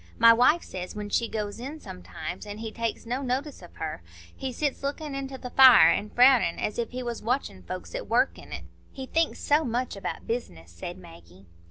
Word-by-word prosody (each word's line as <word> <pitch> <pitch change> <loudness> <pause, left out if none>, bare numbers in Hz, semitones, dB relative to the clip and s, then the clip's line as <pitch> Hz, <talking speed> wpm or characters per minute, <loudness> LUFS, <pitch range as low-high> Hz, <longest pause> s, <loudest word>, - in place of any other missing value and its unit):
My 230 0 +8
wife 255 +9 +4
says, 185 +1 -7
when 210 0 -5
she 230 +3 +1
goes 210 -1 -4
in 280 +6 -6
sometimes, 90 - -8
an' 205 0 -6
he 220 0 -5
takes 230 0 -3
no 250 +4 -2
notice 270 +2 -3
of 175 - -14
her, 155 - -5 0.3
he 265 -1 -4
sits 285 +2 -2
lookin' 290 +1 -4
into 270 -1 -5
the 250 -1 -8
fire, 250 -12 +8
and 210 +5 -2
frownin' 250 -8 +5
as 210 - -2
if 230 - -1
he 255 0 -5
was 240 -1 -4
watchin' 235 - -2
folks 180 - -7
at - - -5
work - - +2
in - - -14
it." - - -6 0.3
"He 265 - -7
thinks 330 +4 0
so 295 +2 +2
much 245 -1 -2
about 195 - -5
business," 85 - -5
said 175 - -7
Maggie. 130 - -15
230 Hz, 210 wpm, -27 LUFS, 185-265 Hz, 0.3 s, My